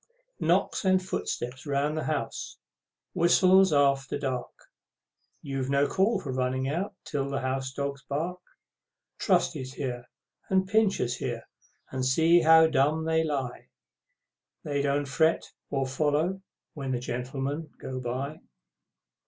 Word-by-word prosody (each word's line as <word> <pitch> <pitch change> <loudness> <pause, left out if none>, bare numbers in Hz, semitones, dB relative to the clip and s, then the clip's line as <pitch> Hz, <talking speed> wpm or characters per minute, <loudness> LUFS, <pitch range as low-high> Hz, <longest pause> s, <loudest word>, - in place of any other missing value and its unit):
Knocks - - +1
and 185 -1 +4
footsteps 130 -7 -4
round 145 +2 0
the 155 - -2
house, 145 -7 -3 0.6
whistles 185 +2 +5
after 140 -2 +2
dark, 130 -3 -5 0.7
You've 135 -2 -3
no 140 +1 +3
call 200 +3 +2
for 140 - -5
running 130 +1 0
out 185 +8 -2
till 140 -1 -2
the 140 -1 -2
house 130 0 -2
dogs 140 0 -4
bark. 165 +6 -2 0.8
Trusty's 160 -8 +1
here, 125 -3 -5 0.4
and 190 0 +2
Pincher's 195 - +2
here, 120 -3 -4 0.5
and 130 -1 -2
see 165 +6 +4
how 160 0 +7
dumb 155 +1 +2
they 160 0 +2
lie, 135 -5 -3 0.9
They 145 -2 -1
don't 140 0 +1
fret 160 +4 +1 0.2
to 135 -1 0
follow 150 +7 0 0.3
when 135 -3 -3
the 125 - -1
Gentlemen 135 +5 -4
go 130 -1 -5
by! 130 +5 -4
140 Hz, 130 wpm, -28 LUFS, 130-160 Hz, 0.9 s, how